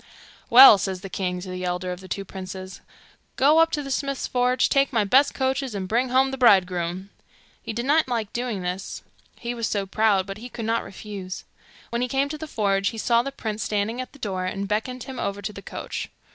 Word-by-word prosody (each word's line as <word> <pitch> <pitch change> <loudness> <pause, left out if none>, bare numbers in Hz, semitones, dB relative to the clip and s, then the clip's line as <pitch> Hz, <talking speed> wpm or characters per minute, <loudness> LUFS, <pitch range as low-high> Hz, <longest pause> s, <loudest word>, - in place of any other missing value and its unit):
'Well,' 240 -4 +10
says 190 0 -3
the 195 -1 -8
king 180 -2 -2
to 185 - -8
the 185 0 -5
elder 180 0 -2
of 180 - -6
the 190 - -11
two 195 +1 -4
princes, 185 0 -8 0.5
'go 295 +4 +5
up 325 0 +5
to 295 - -1
the 275 - -6
smith's 275 0 -2
forge, 250 0 +2
take 275 0 +2
my 225 -4 +2
best 270 +8 +4
coaches, 265 -3 -1
and 190 -2 -3
bring 240 +5 +1
home 265 +1 +3
the 270 - -5
bridegroom.' 185 -4 +3 0.5
He - - -5
did 235 +3 -3
not 305 +2 +3
like 230 -4 -2
doing 235 -6 -3
this, 180 +2 -4 0.3
he 240 0 -4
was 230 -2 -2
so 200 -2 -1
proud, 200 -1 +2
but 195 +1 -7
he 245 +2 -8
could 230 -2 -6
not 230 +1 0
refuse. 195 -2 -7 0.5
When 235 +1 -1
he 250 - +1
came 270 +3 0
to 305 - -5
the 315 - -6
forge 200 -6 0
he 225 - -8
saw 235 +1 +3
the 275 +3 -5
prince 220 -5 -4
standing 215 +4 -1
at 255 - -8
the - - -16
door, 190 -7 -3
and 195 +1 -3
beckoned 230 +4 -2
him 265 -1 -7
over 200 0 -2
to 205 +1 -5
the 200 - -9
coach. - - -6
220 Hz, 230 wpm, -24 LUFS, 195-255 Hz, 0.5 s, Well